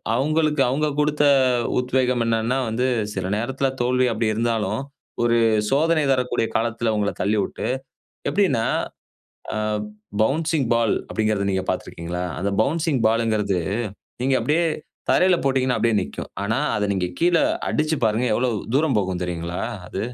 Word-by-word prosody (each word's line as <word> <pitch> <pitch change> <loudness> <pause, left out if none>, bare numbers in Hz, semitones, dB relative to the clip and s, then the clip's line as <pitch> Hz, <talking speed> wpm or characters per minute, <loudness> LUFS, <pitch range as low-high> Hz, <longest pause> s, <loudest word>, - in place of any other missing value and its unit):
அவங்களுக்கு 155 +2 +1
அவங்க 150 +4 +1
குடுத்த 150 0 +2 0.4
அ - - -2
உத்வேகம் 125 -1 +1
என்னன்னா 115 +2 +1
வந்து, 125 +4 0 0.3
சில 95 -1 -2
நேரத்துல 135 +4 -1
தோல்வி 125 +1 +2
அப்டி 110 0 0
இருந்தாலும். 115 0 0 0.4
ஒரு 120 0 +3 0.3
சோதனை 155 +3 +3
தரக்கூடிய 125 -3 0
காலத்துல 115 0 0
உங்கள 105 -1 0
தள்ளிவுட்டு, 105 0 -1 0.6
எப்டின்னா 185 - +2 0.9
ஆ - - -3 0.7
பவுன்சிங் 155 +1 0
பால் 115 -2 +2 0.2
அப்டின்கிறத 110 -2 0
நீங்க 95 0 -1
பாத்தீருக்கிங்களா? 85 +2 -4 0.2
அந்த 100 +2 0
பவுன்சிங் 155 -3 0
பால்ன்குறது 110 -4 +1 0.6
நீங்க 135 +1 +2
அப்டியே 160 +3 +2 0.5
தரையில 185 -1 +4
போட்டீங்கன்னா 130 -2 +1
அப்டியே 115 -2 +2
நிக்கும். 70 - -6
ஆனா, 110 +3 0 0.2
அதை 105 - 0
நீங்க 95 -2 0
கீழ 175 +1 +3 0.3
அடிச்சி 155 +1 0
பாருங்க 110 +3 +1
எவ்வளவு 120 +1 +1 0.2
தூரம் 145 -3 +2
போகும் 95 -3 -1
தெரியுங்களா. 85 0 -3 0.3
அது 95 - -5
120 Hz, 135 wpm, -23 LUFS, 110-140 Hz, 0.9 s, தரையில